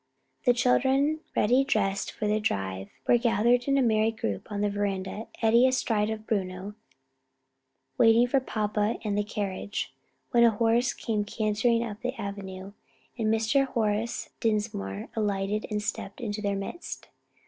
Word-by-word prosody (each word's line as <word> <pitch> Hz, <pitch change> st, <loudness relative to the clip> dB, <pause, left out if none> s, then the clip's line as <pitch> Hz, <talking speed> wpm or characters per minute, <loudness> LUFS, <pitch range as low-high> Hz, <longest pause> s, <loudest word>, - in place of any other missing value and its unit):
The 245 Hz, -, +6 dB
children, 270 Hz, +5 st, +3 dB, 0.2 s
ready 250 Hz, +5 st, +4 dB
dressed 200 Hz, -7 st, 0 dB
for 215 Hz, -, -4 dB
their 210 Hz, +1 st, +2 dB
drive, 95 Hz, -, -2 dB, 0.2 s
were 240 Hz, -, +5 dB
gathered 240 Hz, +1 st, +3 dB
in 275 Hz, 0 st, +3 dB
a 270 Hz, -, +4 dB
merry 220 Hz, -1 st, +3 dB
group 110 Hz, -, -4 dB
on 205 Hz, 0 st, -2 dB
the 210 Hz, -, +2 dB
veranda, 200 Hz, +1 st, -3 dB, 0.2 s
Eddie 235 Hz, +3 st, +6 dB
astride 225 Hz, -5 st, +1 dB
of 220 Hz, -1 st, -5 dB
Bruno, 190 Hz, -1 st, -2 dB, 1.3 s
waiting 230 Hz, 0 st, +6 dB
for 270 Hz, +3 st, +2 dB
papa 210 Hz, -3 st, -1 dB
and 210 Hz, -2 st, -1 dB
the 205 Hz, -, +1 dB
carriage, 205 Hz, -1 st, -4 dB, 0.4 s
when 235 Hz, -1 st, +5 dB
a 235 Hz, -, +8 dB
horse 230 Hz, +3 st, +2 dB
came 215 Hz, -3 st, -1 dB
cantering 220 Hz, +2 st, +1 dB
up 215 Hz, -2 st, -6 dB
the 250 Hz, 0 st, -3 dB
avenue, 195 Hz, -2 st, -6 dB, 0.4 s
and 225 Hz, -3 st, -1 dB
Mr. 225 Hz, +5 st, +2 dB
Horace 225 Hz, -1 st, -1 dB
Dinsmore 210 Hz, -, -2 dB
alighted 205 Hz, -1 st, -1 dB
and 210 Hz, -1 st, -2 dB
stepped 210 Hz, 0 st, -4 dB
into 210 Hz, -3 st, -3 dB
their 200 Hz, -1 st, 0 dB
midst. 195 Hz, -, -6 dB
215 Hz, 150 wpm, -28 LUFS, 205-235 Hz, 1.3 s, a